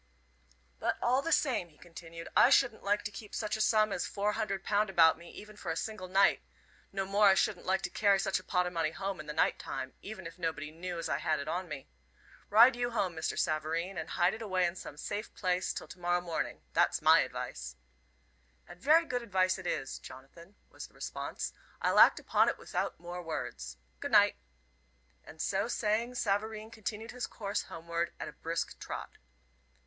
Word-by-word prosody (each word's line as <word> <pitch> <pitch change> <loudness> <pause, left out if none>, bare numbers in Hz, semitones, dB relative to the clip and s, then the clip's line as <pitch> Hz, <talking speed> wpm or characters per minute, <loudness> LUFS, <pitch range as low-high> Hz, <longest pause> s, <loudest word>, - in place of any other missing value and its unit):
"But - - 0
all 255 +3 +2
the 330 - -3
same," 245 - +2
he 150 - -24
continued, 165 0 -10
"I - - +7
shouldn't 255 -4 +4
like 205 +1 +1
to 210 - -4
keep 205 +1 -9
such 215 -1 -1
a 215 - -2
sum 215 -1 +4
as - - -1
four 205 +1 0
hundred 195 -2 -2
pound 210 0 +1
about 165 -4 +6
me, 170 +1 -13
even 215 0 -11
for - - -7
a 160 - 0
single 215 +1 -4
night. 195 +2 +4 0.5
No 195 -1 -2
more 200 +2 +4
I 190 - +7
shouldn't 210 -1 0
like 190 +1 +1
to 180 - -3
carry 200 -2 +4
such 195 -1 0
a - - -14
pot 180 -1 +1
o' 180 - -3
money 165 -3 0
home 195 +2 -4
in 155 - -8
the - - -3
night - - +1
time, 130 0 -5
even 200 -3 -8
if 165 +2 -9
nobody 160 -3 -3
knew 175 +2 -5
as 165 - -3
I 140 - 0
had 155 0 0
it 140 - -5
on 180 +3 -2
me. 140 -3 -7 0.6
Ride 235 +4 +8
you 245 0 -1
home, 190 -7 -1
Mr. 160 - -2
Savareen, 165 +4 -1
and 160 -2 -5
hide 175 +2 +2
it 220 - -7
away 185 -4 +1
in 170 0 -1
some 150 -5 -9
safe 210 +7 -4
place 180 -1 0
till - - -6
to - - -12
morrow 175 0 +1
morning 175 -2 -3
that's - - +3
my - - +7
advice." - - -4 0.9
"And 175 0 -13
very 320 +3 +5
good 250 -5 -2
advice 190 -4 +1
it 185 - -6
is, 135 - -2
Jonathan," 155 +9 -13 0.2
was - - -8
the - - -27
response. - - -5 0.3
"I'll - - +3
act - - +8
upon - - +3
it - - -3
without - - -3
more 175 +1 -6
words. 165 -2 -5 0.2
Good 285 -4 -5
night!" 205 -1 +6 0.9
And 160 - -13
so 195 +6 0
saying, 235 +1 0
Savareen 215 0 -1
continued 220 +1 -5
his 250 0 -4
course 205 -1 -3
homeward 170 +1 -4
at - - -4
a - - -8
brisk 165 +1 -3
trot. - - -6
190 Hz, 205 wpm, -32 LUFS, 170-215 Hz, 0.9 s, Ride